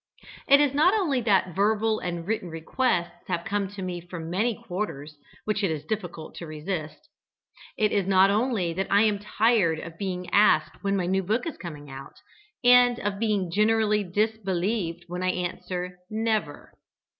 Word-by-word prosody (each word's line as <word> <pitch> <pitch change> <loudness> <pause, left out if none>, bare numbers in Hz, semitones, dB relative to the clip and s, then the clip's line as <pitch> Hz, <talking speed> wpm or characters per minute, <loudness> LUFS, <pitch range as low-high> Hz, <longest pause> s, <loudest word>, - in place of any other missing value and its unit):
It 280 0 +7
is 290 -2 +3
not 320 +8 +4
only 305 - +1
that 195 -5 +2
verbal 215 +2 +2
and 175 -2 -4
written 210 -3 -2
requests 175 +1 -2
have 170 - -2
come 200 -1 -1
to 195 0 -8
me 180 -1 -4
from 170 -1 -7
many 220 +5 +1
quarters 180 -9 -5 0.3
which 210 -1 -1
it 195 - +2
is 155 -2 -4
difficult 175 -5 -5
to 170 - -7
resist; 155 - -5 0.7
it 215 -1 +2
is 200 -2 0
not 195 0 +5
only 210 -6 0
that 190 +3 -2
I 200 +2 +5
am 210 -2 +2
tired 210 -5 +2
of 165 +1 -9
being 180 -2 -3
asked 210 0 +3
when 200 0 +1
my 180 - 0
new 190 +2 +1
book 215 - -1
is 330 - -4
coming 150 -5 -8
out, 135 0 -10 0.5
and 245 0 +6
of 200 -1 -3
being 205 -6 0
generally 210 +1 +2
disbelieved 195 -2 -1
when 180 +1 -5
I 185 - +1
answer 180 0 -4
"never." 215 -8 -2
195 Hz, 170 wpm, -26 LUFS, 175-220 Hz, 0.7 s, It